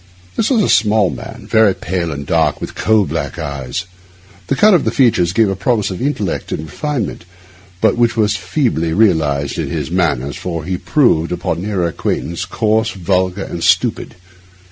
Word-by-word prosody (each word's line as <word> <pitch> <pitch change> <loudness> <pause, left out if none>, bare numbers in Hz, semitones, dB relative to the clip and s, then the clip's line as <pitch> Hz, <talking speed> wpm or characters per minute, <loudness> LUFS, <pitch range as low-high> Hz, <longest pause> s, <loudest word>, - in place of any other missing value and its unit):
This 220 - +1
was 235 -6 +3
a - - +1
small 105 -3 +3
man, 65 - -9
very 110 -3 +4
pale 85 -1 -3
and 70 -1 -5
dark, 80 -3 +1
with - - -6
coal 110 -2 +2
black - - -4
eyes. 70 +4 -4 0.6
The - - +1
cut 210 +8 +5
of 175 - +4
his - - -2
features 110 -10 +3
gave 110 +2 +3
a 95 - -1
promise 105 +1 0
of 90 - -6
intellect 125 - -2
and 75 - -3
refinement 120 - -4 0.6
which 120 +2 +3
was 105 -2 +2
but - - -4
feebly 85 - 0
realised 80 -9 +1
in - - -2
his - - -3
manners, 70 -7 0
for 85 -3 -4
he 90 +1 -2
proved, 100 - +2
upon 85 -2 -2
a 95 - -4
nearer 95 -4 0
acquaintance, 85 +1 -3
coarse, 110 0 +1
vulgar, 95 0 -1
and 85 - -6
stupid. - - +1
95 Hz, 180 wpm, -17 LUFS, 85-110 Hz, 0.6 s, cut